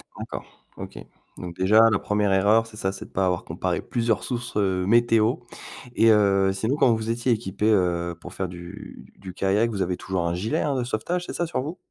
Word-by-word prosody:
Encore? - - -7 0.3
OK. - - -8 0.4
Donc 85 -2 -7
déjà 100 +4 +5
la 100 - +2
1re 105 -1 0
erreur 105 +4 +4
c'est 110 -1 -13
ça, 95 -1 -1
c'est 95 - -9
de - - -16
pas 95 - 0
avoir 90 -1 -1
comparé - - -2
plusieurs 115 -2 -1
sources, 120 -3 -4
heu, 95 -2 0
météo. 115 0 +4 0.6
Et 115 0 +5
heu, 100 -2 +4
sinon, 110 +8 -1
quand 125 -5 +4
vous 110 0 -4
étiez 120 +2 0
équipés, 105 -1 0
heu, 85 -3 +1
pour 90 - -10
faire 95 - -3
du 90 +4 -10
d - - -16
du 95 -2 -9
kayak, 100 +5 +1
vous 100 -3 -3
avez 90 0 -2
toujours 95 -4 -2
un 85 - -1
gilet, 100 +6 -1
hein, 140 -2 0
de 125 - 0
sauvetage, 170 +10 -2
c'est - - -6
ça 175 - -1
sur 160 - -2
vous? 155 +6 -6
105 Hz, 220 wpm, -24 LUFS, 95-115 Hz, 0.6 s, déjà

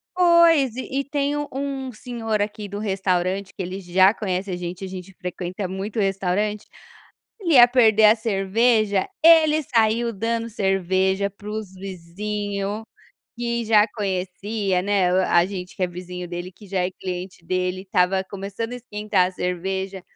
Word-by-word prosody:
Pois, 340 -8 +5
e 260 +1 -3
e - - 0
tem 285 0 -1
um 295 0 -2
um 270 -1 -4
senhor 225 -2 -3
aqui 205 0 -3
do 205 - -5
restaurante, 190 -2 -1
que - - -6
ele 185 +2 -5
já 185 +2 +4
conhece 190 -2 -3
a - - -1
gente, 175 +1 -6
a - - -6
gente 185 0 -8
frequenta 180 +2 -4
muito 195 +4 -4
restaurante, 195 +2 0 0.8
ele 340 -5 +1
ia 240 -2 +10
perder 225 -3 +4
a 210 - +7
cerveja, 215 -1 +1 0.2
ele 315 -2 +6
saiu 230 -2 +1
dando 230 +2 -2
cerveja 190 -1 +1
para 205 +1 -12
os 215 -3 -5
vizinho, 200 +3 -4 0.5
que 235 -1 -2
já 215 -1 +5
conhecia, 195 0 -1
né, 195 -2 +2
o, 185 - +3
a 175 0 +5
gente 185 -1 -7
que 185 - -1
é - - +2
vizinho 180 0 -7
dele, 175 +1 -6
que 205 +2 -15
já 185 -1 0
é - - -1
cliente 180 -1 -6
dele, 185 +1 -1
estava 190 0 +1
começando 200 +4 -6
a - - -4
esquentar 210 -5 0
a 185 - -6
cerveja, 190 +2 -3
200 Hz, 165 wpm, -23 LUFS, 185-225 Hz, 0.8 s, ia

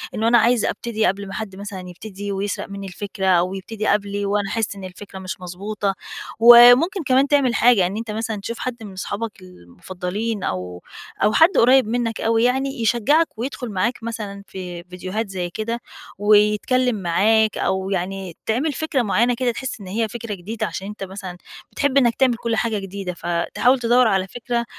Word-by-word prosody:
إنه 220 +1 0
أنا 240 +1 +6
عايز 235 0 +3
أبتدي 220 -2 -1
قبل 200 0 -1
ما 195 - -8
حد 210 -3 -5
مثلًا 200 -1 -7
يبتدي 200 +2 -7
ويسرق 200 0 -3
منِّى 200 0 -7
الفِكرة 195 +1 -4
أو 180 0 +3
يبتدي 210 +3 -5
قبلي 205 0 0
وأنا 200 0 0
أحِس 225 -3 -2
إن 195 - -10
الفكرة 190 +1 -9
مش 185 0 -7
مضبوطة 195 +3 -3 0.5
وممكن 245 - +8
كمان 265 +1 +3
تعمل 280 -4 +3
حاجة، 220 -7 +4
إن 200 +3 -5
أنت 225 -1 -5
مثلًا 220 -1 -3
تشوف 230 +3 -5
حد 240 -3 -5
من 205 - -8
أصحابك 200 +3 -5
المُفضّلين 180 - -6
أو 90 -1 -4 0.4
أو 210 +1 +3
حد 325 +2 +6
قريّب 255 -1 +5
منّك 230 -1 -2
أوى 225 0 +2
يعني 265 0 0
يشجّعك 250 +9 +3
ويدخُل 245 0 -4
معاك 225 +5 -1
مثلًا 210 -4 -6
في 180 -2 -7
فيديوهات 185 +4 -5
زي 180 -2 -3
كده 230 +5 -3 0.4
ويتكلّم 210 +4 +3
معاك 210 +4 +2
أو 190 0 -1
يعني 190 -2 -3
تعمل 270 +7 0
فكرة 315 -2 -1
معيّنة 235 +2 +2
كده 245 0 0
تحِس 260 +1 -5
إن 190 - -9
هي 220 +4 -1
فكرة 230 -1 -6
جديدة 200 +4 -4
عشان 195 0 -6
أنت 210 -1 -7
مثلًا 190 -2 -7 0.3
بتحب 280 -1 0
إنّك 240 -4 +4
تعمل 255 -3 +3
كل 230 0 -2
حاجة 220 -1 0
جديدة، 195 -1 -5
فتحاول 175 +10 +1
تدوّر 245 0 +4
على 190 -2 +1
فكرة 240 +2 -3
210 Hz, 180 wpm, -21 LUFS, 190-235 Hz, 0.5 s, وممكن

